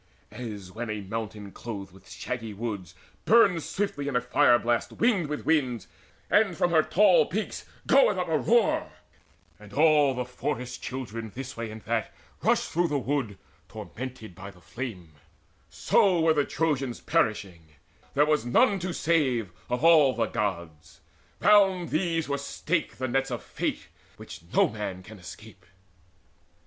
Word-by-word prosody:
As 105 -6 -7
when 115 +3 -5
a 105 -1 -3
mountain 105 0 -6
clothed 100 -5 -7
with 95 0 -18
shaggy 115 -4 -5
woods 100 -6 -5 0.3
Burns 195 -7 +4
swiftly 165 -8 -2
in 145 - -2
a 125 - +3
fire 125 +1 +4
blast 120 0 -1
winged 210 -9 +1
with 150 0 -5
winds, 125 - +1 0.4
And 205 -5 +2
from 175 - +1
her 160 -2 +5
tall 210 - +4
peaks - - -4 0.2
goeth - - +4
up - - -1
a - - +1
roar, 480 - +2 0.7
And - - -14
all 150 -3 +4
the 125 0 -2
forest 125 0 -4
children 115 -4 -6
this 135 0 -6
way 115 -1 -5
and 110 0 -10
that 115 +1 -2 0.3
Rush - - +3
through 175 +1 0
the 145 -2 -1
wood, 130 -7 -2 0.3
tormented 125 -5 -8
by 95 +3 -9
the 90 -3 -16
flame; 90 -2 -7 0.6
So 185 -4 +2
were 160 0 +4
the 145 -2 +1
Trojans 140 -6 -1
perishing: 100 - -1 0.5
there 145 +1 +5
was 150 0 +1
none 195 - +3
To 180 0 -3
save, 130 - +1 0.2
of 125 +3 -2
all 155 -6 +6
the 115 - +1
Gods. 85 -7 -4 0.4
Round 195 -4 +4
these 165 -1 0
were 140 -1 -2
staked 155 +4 -2
The 130 - -2
nets 135 +2 0
of 120 -2 -4
Fate, - - -4 0.3
which - - -10
no - - +4
man 105 -4 -6
can 100 +2 -12
escape. 100 +1 -12
125 Hz, 155 wpm, -27 LUFS, 110-155 Hz, 0.7 s, all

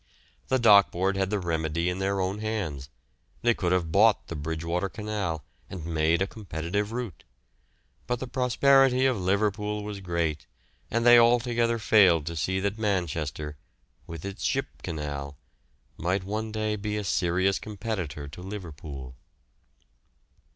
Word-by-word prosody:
The 130 - +2
Dock 105 -5 +7
Board 95 +3 0
had 95 -1 0
the 105 - 0
remedy 85 -2 -1
in 90 +1 -1
their 100 0 0
own 95 +2 -1
hands; 95 -12 -3 0.5
they 120 0 +4
could 90 -5 -1
have 90 -3 +1
bought 105 +4 +4
the 85 - -4
Bridgewater 85 +5 -2
Canal, 100 -8 -3 0.3
and 90 -5 -7
made 80 +2 +2
a - - 0
competitive 100 0 -3
route; 115 - -5 0.8
but 125 -1 -1
the - - -4
prosperity 130 +1 +4
of 125 -7 +1
Liverpool 105 +2 0
was 105 -1 -5
great, 85 -5 -2 0.4
and 115 +1 0
they 120 0 +9
altogether 120 0 +3
failed 95 -8 +5
to 85 +1 -4
see 95 +4 0
that 100 +2 -2
Manchester, 80 -7 -2 0.5
with 80 0 -7
its 100 -1 -6
Ship - - +1 0.2
Canal, 70 -2 -5 0.6
might 90 +3 -1
one 110 +3 -3
day 110 0 -1
be 105 0 -3
a 105 - -2
serious 95 +1 +1
competitor 95 -9 -5
to 75 +5 -10
Liverpool. 80 -9 -8
95 Hz, 145 wpm, -27 LUFS, 85-110 Hz, 0.8 s, they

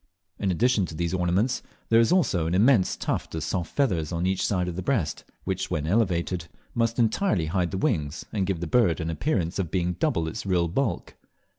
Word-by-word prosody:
In 100 - 0
addition 105 +1 +2
to 80 - -8
these 85 +2 -2
ornaments, 95 +7 +1 0.3
there 115 - +6
is 115 - +4
also 95 - +2
an 85 - 0
immense 110 -1 +4
tuft - - -3
of 80 - -3
soft 85 +1 -2
feathers 90 - +1
on 85 +1 -1
each 95 0 0
side 90 -3 0
of 90 - -4
the 95 - -3
breast, 90 - -1 0.2
which 95 0 -2
when 75 -1 -1
elevated 90 -3 0 0.3
must 115 0 0
entirely 115 - +2
hide 90 +2 0
the 95 - -3
wings, 80 - -1
and 100 -4 0
give 95 -4 -1
the - - -1
bird 85 -3 +3
au 80 - -3
appearance 90 - -1
of 90 -4 -1
being 90 0 0
double 90 - 0
its 80 - -5
real 90 -3 +1
bulk. 100 +1 -2
90 Hz, 205 wpm, -26 LUFS, 85-110 Hz, 0.3 s, there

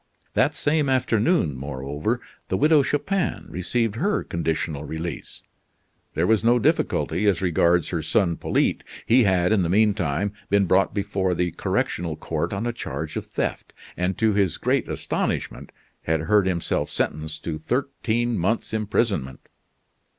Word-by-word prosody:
That - - +2
same 150 -1 +1
afternoon, 120 - +2
moreover, 70 - -3 0.3
the - - 0
Widow 150 0 +5
Chupin 175 +7 -1
received 115 +5 -1
her 205 - 0
conditional 80 -3 -2
release. 80 +2 -6 0.7
There 85 - +2
was 110 +2 +3
no 120 +2 +5
difficulty 105 -2 +1
as 100 - +3
regards 85 -1 +3
her 85 -3 -2
son, 85 +2 +1
Polyte. - - 0 0.2
He 120 0 +5
had, 90 -1 +2
in 110 -3 +3
the 85 - 0
mean 105 +3 +4
time, 95 +1 -1 0.2
been 100 0 +3
brought 95 +2 +2
before 100 -3 0
the 90 0 0
correctional 85 0 -1
court 80 +2 -3
on 100 +3 -2
a 120 - -1
charge 75 - -5
of - - -4
theft; - - -3 0.2
and, 90 +1 -1
to 110 -1 +2
his 100 -5 +1
great - - 0
astonishment, - - -3 0.3
had 80 -1 0
heard 100 +3 +3
himself 85 -3 -1
sentenced 75 0 -2
to 80 -2 -3
thirteen 120 - -1
months' 110 +6 -1
imprisonment. 100 - -1
95 Hz, 150 wpm, -24 LUFS, 80-115 Hz, 0.7 s, Widow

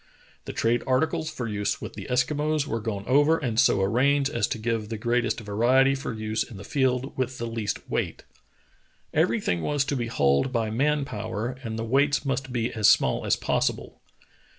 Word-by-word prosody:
The - - -5
trade 115 +1 +1
articles 150 +4 +1
for 125 -5 -5
use 105 -1 -2
with - - -7
the - - -8
Eskimos 145 +4 +1
were 115 -4 -2
gone 105 -3 -4
over 145 +6 +4
and 120 -7 -1
so 95 - +4
arranged 135 +7 +2
as 120 - 0
to - - -3
give 110 -1 -2
the 115 - -3
greatest 120 +2 0
vari 115 +5 +2
ety 135 +1 +4
for 135 -1 -4
use 110 -1 -2
in 115 - -5
the 100 - -9
field 130 +2 0
with 130 0 -1
the 120 - -4
least 115 -3 -4
weight. - - -2 0.9
Every - - +2
thing 85 -1 -1
was 145 - 0
to 145 - -1
be 120 -3 -2
hauled 70 - +2
by 115 -3 -1
man 145 +5 +1
power 110 +1 -4
and 110 -2 -4
the 115 - -3
weights 140 +3 +2
must 135 -1 -2
be 120 -1 -1
as 110 -2 +4
small - - +2
as - - +4
possible. - - -2
120 Hz, 200 wpm, -26 LUFS, 110-135 Hz, 0.9 s, over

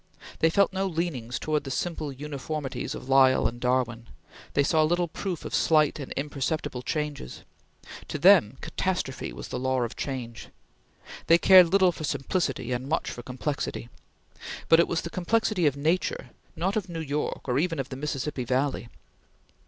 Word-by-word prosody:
They 160 - +4
felt 200 +3 +2
no 195 0 0
leanings 160 -9 -3
towards 155 -1 -1
the 135 - -6
simple 155 +1 -3
uniformities 145 0 -5
of - - -9
Lyell 135 -1 +5
and 120 +1 -6
Darwin; 125 -2 0 0.5
they 145 - +4
saw 155 +2 +3
little 175 +3 +2
proof 180 +1 -5
of - - -6
slight 155 -2 +3
and 140 - -7
imperceptible 140 -2 -3
changes; 150 - -4 0.6
to - - -4
them, 155 - +5
catastrophe 175 -9 -3
was - - -8
the 125 - -3
law 130 -1 0
of 115 - -4
change; 125 -4 -5 0.8
they 165 - +7
cared 185 0 +8
little 190 -2 +5
for 160 - -8
simplicity 135 -4 -2
and 125 +2 -3
much 160 - -1
for 120 - -7
complexity; 130 -1 -4 0.8
but 165 - +7
it 170 - +4
was 165 - -1
the 170 - -7
complexity 185 -1 +1
of 140 -1 0
Nature, 160 +6 -1 0.2
not 190 +4 -1
of 205 -3 -2
New 165 -1 -5
York 150 -1 -3
or 125 +1 +1
even 165 0 0
of 135 -1 -3
the 130 - -6
Mississippi 140 -1 -3
Valley. 130 0 -1
150 Hz, 170 wpm, -27 LUFS, 130-170 Hz, 0.8 s, cared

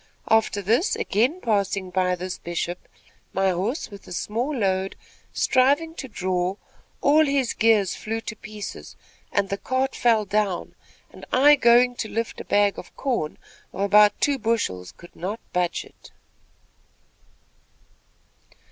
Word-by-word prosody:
After 220 -2 +2
this, 235 - +2
again 250 - 0
passing 200 -4 0
by 180 0 +1
this 180 +1 -6
Bishop, 175 +1 -4 0.5
my 195 0 +2
horse 205 - -2
with 200 -1 -12
a - - -11
small 235 - -2
load, 190 -3 0 0.4
striving 285 +5 +2
to 275 - -7
draw, 185 -3 -1 0.5
all 300 +2 +5
his 275 -4 +1
gears 215 -4 +3
flew 225 +1 -4
to 215 - -6
pieces, 215 -1 -8 0.4
and 200 -1 0
the 200 - -3
cart 260 +3 -1
fell 225 -3 +3
down, 205 -2 -1 0.4
and - - -14
I, 280 +4 +6
going 245 -1 +5
to 220 - -3
lift 230 0 -3
a - - -10
bag 205 -1 +2
of 180 - -12
corn, 240 - -2 0.4
of 195 - -5
about 205 +1 +5
two 280 -2 +1
bushels, 205 - -1
could 175 - -16
not 200 +6 -4
budge 180 -1 -1
it." - - -17
210 Hz, 140 wpm, -24 LUFS, 190-245 Hz, 0.5 s, I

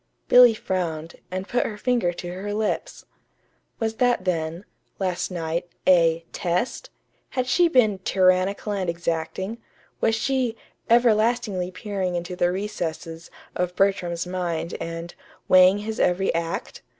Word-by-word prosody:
Billy 245 -2 +8
frowned, 170 -5 -3
and 185 +2 -4
put 245 - +1
her 210 - -5
finger 235 -5 +1
to 175 0 -7
her 205 +3 -4
lips. 215 0 -2 0.7
Was 220 -1 -2
that 245 -6 +2
then, 165 +1 -2 0.3
last 185 -2 -1
night, 170 -1 -3 0.2
a 165 -2 +4
"test"? 180 - -2 0.4
Had 255 -2 -1
she 340 +8 +4
been 220 - +3
"tyrannical 185 +2 +2
and 190 -3 -1
exacting"? 170 +6 -3 0.4
Was 225 0 +2
she 255 0 0 0.3
"everlastingly 225 -5 +3
peering 185 -1 -3
into 175 +1 -4
the 175 0 +2
recesses" 170 -4 -5 0.3
of 180 0 -2
Bertram's 180 -3 +1
mind 175 -2 -3
and 165 +1 -5 0.3
"weighing 185 +1 +7
his 215 +1 -5
every 180 +2 +2
act"? 170 +2 -3
185 Hz, 130 wpm, -24 LUFS, 175-215 Hz, 0.7 s, Billy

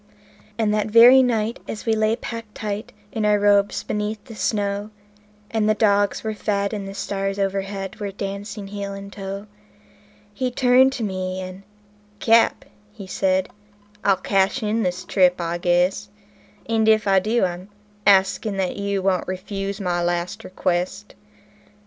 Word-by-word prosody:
And 215 -2 +1
that 210 0 0
very 235 +4 +8
night, 230 -2 0
as 215 - -6
we 225 - +2
lay 220 +1 +2
packed 230 -2 -8
tight 210 0 -4 0.2
in 220 - -2
our 210 0 +4
robes 205 0 +2
beneath 210 +1 -3
the 240 - -10
snow, 205 +1 -1 0.6
And 215 -1 +1
the 215 - +3
dogs 205 -2 +2
were 220 -1 -2
fed, 200 -1 -1
and 200 -2 -4
the 195 - -8
stars 195 -1 -2
o'erhead 195 0 -3
were 205 -1 -3
dancing 200 +1 -6
heel 200 -1 -5
and 195 0 -9
toe, 195 0 -6 0.9
He 255 +4 -1
turned 255 +1 +4
to 245 - -4
me, 185 -2 -3
and 185 +1 -7 0.6
"Cap," 230 +2 +3 0.4
says 190 0 +1
he, - - -18 0.5
"I'll 195 - +4
cash 195 +2 +1
in 215 +2 0
this 180 -2 -2
trip, 180 -2 +3
I 170 0 -2
guess; 180 +3 +1 0.6
And 220 -1 +2
if 215 -1 +3
I 195 -1 +5
do, 215 +2 +1
I'm 180 +2 -5 0.4
asking 195 +1 +3
that 190 -2 -1
you 200 -1 -2
won't 185 -2 +1
refuse 195 +1 -4
my 175 -3 -1
last 175 0 -2
request." 185 +3 -2
200 Hz, 155 wpm, -22 LUFS, 190-215 Hz, 0.9 s, very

